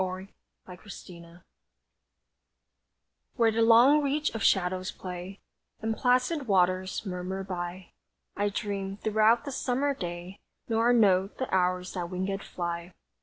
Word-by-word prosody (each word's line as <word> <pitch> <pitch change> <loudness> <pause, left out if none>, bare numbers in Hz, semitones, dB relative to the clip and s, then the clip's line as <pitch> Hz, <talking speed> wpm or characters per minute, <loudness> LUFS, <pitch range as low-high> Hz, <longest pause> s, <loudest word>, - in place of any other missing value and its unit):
WHERE 185 +1 -5 0.4
THE 180 +3 -13
SHADOWS - - -8
PLAY 170 -1 -13 2.0
Where 230 -3 +3
the 225 +1 0
long 240 +6 +6
reach 295 0 0
of 225 - -4
shadows 185 -1 +2
play, 185 +1 -7 0.4
And 220 0 -2
placid 255 +4 +1
waters 185 0 +1
murmur 190 +1 -4
by 180 -1 -6 0.4
I 205 0 0
dream 200 -1 -4
throughout 220 +4 +3
the 280 - -4
summer 270 +2 0
day 175 -3 -7 0.3
Nor 230 +1 +2
note 195 -4 +3
the 260 - -4
hours 180 0 +1
that 175 -2 -3
wingéd 190 +2 -3
fly. 170 0 -5
195 Hz, 130 wpm, -28 LUFS, 180-225 Hz, 2.0 s, long